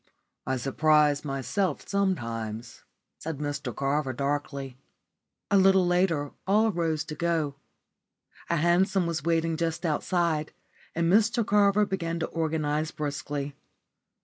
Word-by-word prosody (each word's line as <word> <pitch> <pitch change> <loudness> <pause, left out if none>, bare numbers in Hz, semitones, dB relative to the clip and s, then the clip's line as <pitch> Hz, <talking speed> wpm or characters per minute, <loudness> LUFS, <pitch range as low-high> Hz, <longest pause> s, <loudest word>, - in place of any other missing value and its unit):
"I 130 - 0
surprise 150 +3 +3
myself 145 +5 -2
sometimes," 115 - -2 0.4
said 160 -2 -5
Mr 145 -4 -4
Carver, 140 0 0
darkly. 140 -1 -3 0.7
A 200 - +5
little 190 -1 +5
later 175 -5 +1 0.2
all 215 +3 +4
rose 165 -4 -1
to 155 - -7
go. 155 -3 -1 0.9
A 170 - +2
hansom 175 +3 +2
was 170 -2 -2
waiting 165 0 +1
just 165 +1 -2
outside, 160 -1 0 0.4
and 170 0 +1
Mr 225 +1 +3
Carver 205 0 +4
began 170 -4 -2
to 165 - -1
organise 155 -1 -1
briskly. 145 -1 -4
160 Hz, 120 wpm, -27 LUFS, 145-175 Hz, 0.9 s, A